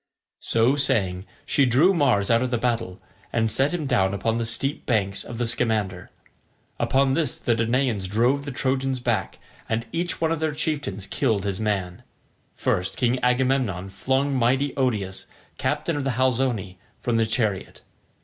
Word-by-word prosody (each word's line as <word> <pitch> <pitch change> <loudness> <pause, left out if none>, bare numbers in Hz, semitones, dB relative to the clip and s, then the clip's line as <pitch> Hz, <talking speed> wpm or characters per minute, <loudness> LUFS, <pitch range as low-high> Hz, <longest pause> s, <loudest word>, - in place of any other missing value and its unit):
So 115 +4 +2
saying, 100 -9 0 0.2
she 140 -3 +3
drew 145 +11 +5
Mars 125 - +2
out 115 0 +4
of 130 - 0
the 120 - 0
battle, 115 -6 -2 0.3
and 115 -1 +1
set 135 +6 +3
him 175 -4 -2
down 95 -6 +2
upon 115 +3 0
the 115 - -1
steep 135 +5 -2
banks 100 -5 0
of 115 - -8
the 120 - 0
Scamander. 105 -6 -1 0.7
Upon 135 0 +2
this 150 -4 0
the 120 - 0
Danaans 115 -3 0
drove 120 +7 +2
the 140 - -5
Trojans 130 0 -1
back, 115 -6 -1 0.3
and 115 +1 -1
each 175 +1 -1
one 160 -1 +1
of 165 - 0
their 155 -2 -1
chieftains 145 -11 -2
killed 100 -1 0
his 100 -1 -2
man. 100 -5 -2 0.5
First 90 +1 -1
King 125 +1 +1
Agamemnon 125 -7 +1
flung 135 +7 0
mighty 130 +3 +2
Odius, 105 -8 -1 0.3
captain 170 - -1
of 145 - -2
the 135 -2 0
Halizoni, 120 -8 0 0.2
from 115 -2 0
his 110 -1 +1
chariot. 110 -5 -1
120 Hz, 165 wpm, -24 LUFS, 105-135 Hz, 0.7 s, drew